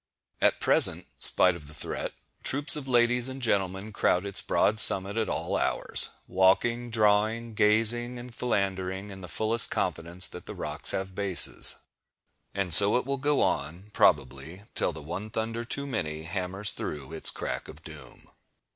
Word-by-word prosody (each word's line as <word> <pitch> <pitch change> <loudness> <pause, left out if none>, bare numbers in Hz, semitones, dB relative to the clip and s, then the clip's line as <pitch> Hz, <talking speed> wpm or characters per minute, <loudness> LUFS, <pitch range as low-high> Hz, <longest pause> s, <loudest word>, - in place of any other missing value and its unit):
At - - +2
present, - - +3
spite 90 -1 +4
of 75 -4 -12
the 75 - -12
threat, - - -5 0.3
troops 145 +2 +1
of 145 -3 -7
ladies 120 0 +2
and 130 +1 -8
gentlemen 100 -3 -2
crowd 90 0 0
its 100 -1 -2
broad 105 +1 0
summit 100 0 +6
at 110 -3 -2
all - - -3
hours, - - +2 0.2
walking, 115 +6 +1
drawing, 110 +1 0
gazing, 115 +4 +4
and 120 0 -10
philandering, 95 -4 -3
in 95 -1 -11
the 90 - -9
fullest 110 +5 0
confidence 85 +2 0
that - - -10
rocks - - -4
have 95 0 -3
bases. 95 -2 +2 0.8
And 95 -4 -3
so 100 +7 +7
it 125 - -3
will 140 +1 -3
go 145 +2 0
on, 85 +8 -4
probably, 70 +7 0
till - - -1
the 80 -2 -10
"one 90 +8 -7
(thunder) 115 +1 -4
too 140 +4 -4
many" 80 - -5
hammers 95 +4 -3
through 75 0 -7
its 80 - +1
crack - - -5
of - - -14
doom. - - -13
100 Hz, 160 wpm, -26 LUFS, 90-115 Hz, 0.8 s, so